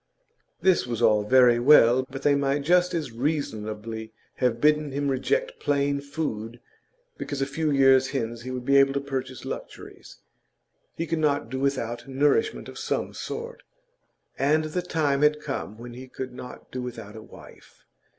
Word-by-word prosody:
This 185 Hz, -8 st, +3 dB
was 120 Hz, -2 st, -3 dB
all 105 Hz, -2 st, +5 dB
very 120 Hz, +1 st, +5 dB
well, 130 Hz, -1 st, +6 dB
but 135 Hz, +1 st, -8 dB
they 145 Hz, -, +4 dB
might 140 Hz, 0 st, 0 dB
just 180 Hz, +3 st, +3 dB
as 150 Hz, -7 st, -3 dB
reasonably 110 Hz, -5 st, -3 dB, 0.3 s
have 125 Hz, -3 st, +1 dB
bidden 150 Hz, 0 st, +2 dB
him 140 Hz, +1 st, -1 dB
reject -, -, -1 dB
plain 140 Hz, 0 st, 0 dB
food 120 Hz, -6 st, -5 dB, 0.6 s
because 145 Hz, -, -4 dB
a 135 Hz, -, +1 dB
few 155 Hz, +3 st, -2 dB
years 135 Hz, -2 st, +4 dB
hence 115 Hz, -4 st, -3 dB
he 130 Hz, -, -7 dB
would 125 Hz, -1 st, -5 dB
be 140 Hz, +1 st, +4 dB
able 135 Hz, 0 st, +5 dB
to 140 Hz, -, 0 dB
purchase 130 Hz, -2 st, -5 dB
luxuries; -, -, -9 dB, 0.8 s
he 165 Hz, -, -3 dB
could 165 Hz, 0 st, -2 dB
not 145 Hz, -6 st, 0 dB
do 130 Hz, -, -3 dB
without 130 Hz, -3 st, -2 dB
nourishment 145 Hz, -, +1 dB
of -, -, -9 dB
some -, -, -2 dB
sort, 475 Hz, +1 st, -6 dB, 0.8 s
and 150 Hz, +3 st, +3 dB
the 155 Hz, +4 st, -2 dB
time 155 Hz, -5 st, 0 dB
had 150 Hz, 0 st, +4 dB
come 135 Hz, -7 st, -5 dB
when 120 Hz, +1 st, -9 dB
he 130 Hz, +2 st, -10 dB
could 130 Hz, 0 st, -7 dB
not 125 Hz, 0 st, -10 dB
do 130 Hz, -, -4 dB
without 115 Hz, -4 st, -7 dB
a 110 Hz, -, -8 dB
wife. -, -, -16 dB
135 Hz, 170 wpm, -25 LUFS, 120-150 Hz, 0.8 s, well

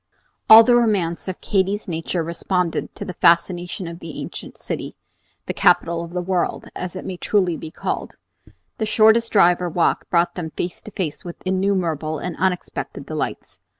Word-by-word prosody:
All 220 Hz, +1 st, +11 dB
the 240 Hz, +1 st, +4 dB
romance 200 Hz, -9 st, +1 dB
of 185 Hz, -, -5 dB
Katy's 200 Hz, +2 st, 0 dB
nature 165 Hz, 0 st, -2 dB
responded 170 Hz, +1 st, -2 dB
to -, -, -6 dB
the 180 Hz, -, -5 dB
fascination 175 Hz, +2 st, +2 dB
of 170 Hz, 0 st, -8 dB
the 165 Hz, -3 st, -8 dB
ancient -, -, -8 dB
city, -, -, -5 dB, 0.5 s
the -, -, -3 dB
capital 170 Hz, 0 st, +3 dB
of 170 Hz, -, -8 dB
the 180 Hz, 0 st, -2 dB
world, 180 Hz, -1 st, -1 dB
as 180 Hz, 0 st, -5 dB
it 185 Hz, -, -6 dB
may 185 Hz, -, -5 dB
truly 185 Hz, -3 st, +1 dB
be 160 Hz, -, -7 dB
called. -, -, -4 dB, 0.6 s
The 220 Hz, -, 0 dB
shortest 220 Hz, +2 st, +4 dB
drive 180 Hz, -3 st, +5 dB
or 175 Hz, -, -1 dB
walk 170 Hz, +1 st, 0 dB
brought 170 Hz, 0 st, +2 dB
them 170 Hz, -3 st, -5 dB
face 175 Hz, 0 st, -4 dB
to 215 Hz, -, -10 dB
face 175 Hz, -7 st, -4 dB
with 175 Hz, -1 st, -9 dB
innumerable 185 Hz, -5 st, 0 dB
and 175 Hz, +3 st, -5 dB
unexpected 185 Hz, -2 st, -2 dB
delights. -, -, -5 dB
180 Hz, 175 wpm, -21 LUFS, 170-195 Hz, 0.6 s, All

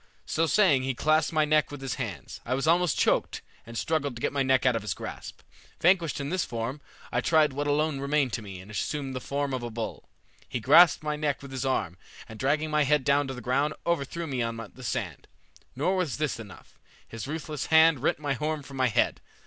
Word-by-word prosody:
So 165 Hz, +1 st, 0 dB
saying 155 Hz, -5 st, +4 dB
he 130 Hz, 0 st, -2 dB
clasped 155 Hz, +3 st, +2 dB
my 155 Hz, -1 st, +2 dB
neck 155 Hz, 0 st, +2 dB
with 145 Hz, -, -8 dB
his 135 Hz, -2 st, -3 dB
hands. 115 Hz, -8 st, -6 dB
I 125 Hz, -, -1 dB
was 135 Hz, -, -1 dB
almost 170 Hz, -1 st, +3 dB
choked, -, -, +1 dB, 0.2 s
and 115 Hz, 0 st, -7 dB
struggled 145 Hz, -4 st, -1 dB
to -, -, -8 dB
get -, -, -1 dB
my 140 Hz, -, +1 dB
neck 130 Hz, -1 st, +2 dB
out 125 Hz, -2 st, +4 dB
of 115 Hz, -, -1 dB
his 105 Hz, -3 st, -3 dB
grasp. -, -, -8 dB, 0.4 s
Vanquished 170 Hz, -4 st, +3 dB
in 140 Hz, +2 st, -4 dB
this 185 Hz, -1 st, +1 dB
form, 120 Hz, +5 st, -4 dB, 0.3 s
I 125 Hz, -, +1 dB
tried 150 Hz, +2 st, +3 dB
what 145 Hz, +2 st, -2 dB
alone 150 Hz, 0 st, +1 dB
remained 140 Hz, -2 st, 0 dB
to 115 Hz, -, -2 dB
me 100 Hz, -3 st, -9 dB
and 100 Hz, +3 st, -13 dB
assumed 135 Hz, +5 st, -3 dB
the -, -, -2 dB
form 140 Hz, +1 st, -2 dB
of 130 Hz, -, -2 dB
a 120 Hz, -, -4 dB
bull. 115 Hz, 0 st, -6 dB, 0.4 s
He 125 Hz, -, -2 dB
grasped 155 Hz, +8 st, +6 dB
my 150 Hz, 0 st, -1 dB
neck 150 Hz, -2 st, -1 dB
with 140 Hz, -, -9 dB
his 130 Hz, 0 st, -3 dB
arm, 90 Hz, -9 st, -1 dB, 0.3 s
and 110 Hz, -1 st, -11 dB
dragging 150 Hz, +3 st, 0 dB
my 150 Hz, 0 st, +3 dB
head 145 Hz, 0 st, +2 dB
down 140 Hz, +1 st, +2 dB
to 135 Hz, -, -5 dB
the 125 Hz, -, -8 dB
ground, 140 Hz, +6 st, 0 dB
overthrew 170 Hz, 0 st, -1 dB
me 130 Hz, -5 st, -2 dB
on 115 Hz, 0 st, -2 dB, 0.2 s
the 130 Hz, -, -12 dB
sand. -, -, -4 dB, 0.5 s
Nor 165 Hz, +9 st, +1 dB
was 180 Hz, -7 st, -1 dB
this 150 Hz, -5 st, -1 dB
enough. 105 Hz, -5 st, -13 dB, 0.3 s
His 115 Hz, +2 st, -7 dB
ruthless 155 Hz, -1 st, -4 dB
hand 160 Hz, -2 st, +6 dB
rent 130 Hz, -, +1 dB
my 145 Hz, -2 st, -2 dB
horn 150 Hz, +2 st, -2 dB
from 135 Hz, 0 st, -10 dB
my 130 Hz, -1 st, +3 dB
head. 115 Hz, -, +1 dB
140 Hz, 230 wpm, -27 LUFS, 125-155 Hz, 0.5 s, grasped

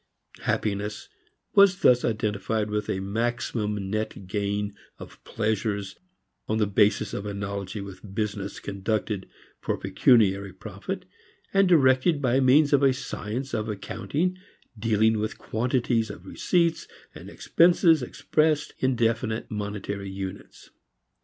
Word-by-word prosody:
Happiness 105 Hz, 0 st, -2 dB, 0.4 s
was 200 Hz, -1 st, +5 dB
thus 125 Hz, -7 st, +5 dB
identified 105 Hz, -1 st, -1 dB
with 105 Hz, 0 st, -2 dB
a 95 Hz, -, -1 dB
maximum 105 Hz, -1 st, -2 dB
net 110 Hz, -2 st, -3 dB
gain 100 Hz, +1 st, -2 dB, 0.2 s
of -, -, -12 dB
pleasures 105 Hz, -3 st, -2 dB, 0.5 s
on 110 Hz, -, 0 dB
the 110 Hz, -, +3 dB
basis 105 Hz, +1 st, +2 dB
of 100 Hz, -, -4 dB
analogy 100 Hz, 0 st, -4 dB
with 100 Hz, 0 st, -10 dB
business 105 Hz, -2 st, -3 dB
conducted 100 Hz, 0 st, -3 dB, 0.3 s
for -, -, -2 dB
pecuniary 100 Hz, -5 st, +3 dB
profit, 105 Hz, -, -6 dB, 0.5 s
and 195 Hz, -1 st, +4 dB
directed 145 Hz, 0 st, +4 dB
by 130 Hz, -1 st, +2 dB
means 140 Hz, +3 st, +5 dB
of 140 Hz, -, +5 dB
a 135 Hz, -1 st, +5 dB
science 130 Hz, 0 st, -5 dB
of 110 Hz, +1 st, -2 dB
accounting 145 Hz, -, -2 dB, 0.4 s
dealing 110 Hz, 0 st, +2 dB
with 110 Hz, +1 st, -3 dB
quantities 120 Hz, -1 st, 0 dB
of 95 Hz, -3 st, -9 dB
receipts 170 Hz, -, 0 dB, 0.3 s
and -, -, -10 dB
expenses 170 Hz, -2 st, +4 dB
expressed 155 Hz, +4 st, 0 dB
in 130 Hz, -1 st, +1 dB
definite 115 Hz, -1 st, -1 dB
monetary 105 Hz, -1 st, -4 dB
units. 95 Hz, -1 st, -8 dB
110 Hz, 120 wpm, -26 LUFS, 100-130 Hz, 0.5 s, was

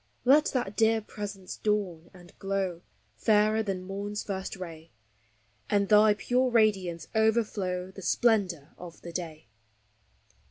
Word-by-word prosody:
Let 290 Hz, +4 st, +6 dB
that 240 Hz, -6 st, -2 dB
dear 225 Hz, 0 st, +3 dB
Presence 205 Hz, -3 st, -7 dB
dawn 190 Hz, -6 st, -1 dB
and 175 Hz, -1 st, -16 dB
glow, 195 Hz, -3 st, -2 dB, 0.4 s
fairer 215 Hz, 0 st, +3 dB
than 195 Hz, -4 st, -3 dB
morn's 200 Hz, +2 st, -4 dB
first 190 Hz, -1 st, -4 dB
ray, 165 Hz, -3 st, -9 dB, 0.8 s
And 200 Hz, -1 st, +1 dB
thy 210 Hz, 0 st, +6 dB
pure 250 Hz, +4 st, +1 dB
radiance 195 Hz, -8 st, +1 dB
overflow 210 Hz, -5 st, 0 dB
the 195 Hz, -, -10 dB
splendor 185 Hz, -, +1 dB
of 175 Hz, -2 st, -11 dB
the 170 Hz, -, -8 dB
day. 160 Hz, -4 st, -6 dB
195 Hz, 125 wpm, -28 LUFS, 180-215 Hz, 0.8 s, Let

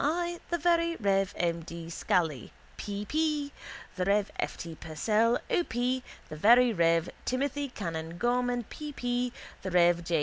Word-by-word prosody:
I.; 345 Hz, +3 st, 0 dB
the 345 Hz, -, +1 dB
very 335 Hz, 0 st, +2 dB
rev. 195 Hz, -, +1 dB
M. 170 Hz, -1 st, 0 dB
D. 165 Hz, 0 st, -8 dB
Scally, 160 Hz, -7 st, 0 dB, 0.2 s
P. 205 Hz, 0 st, -4 dB
P.; 300 Hz, +1 st, 0 dB, 0.5 s
the 185 Hz, -, +1 dB
rev. 200 Hz, +1 st, +2 dB
F. -, -, -2 dB
T. 165 Hz, -1 st, -6 dB
Purcell, 210 Hz, +10 st, +1 dB
O. 350 Hz, -, +3 dB
P.; 250 Hz, -1 st, -1 dB, 0.3 s
the 155 Hz, -, -7 dB
very 235 Hz, +8 st, +6 dB
rev. 165 Hz, -2 st, +2 dB
Timothy 280 Hz, +2 st, -1 dB
canon 165 Hz, -6 st, -5 dB
Gorman, 245 Hz, +2 st, +1 dB
P. 300 Hz, +6 st, -7 dB
P.; 245 Hz, -1 st, -1 dB, 0.3 s
the 190 Hz, -, -4 dB
rev. 175 Hz, -1 st, +4 dB
J. 165 Hz, -1 st, +1 dB
220 Hz, 160 wpm, -29 LUFS, 170-265 Hz, 0.5 s, very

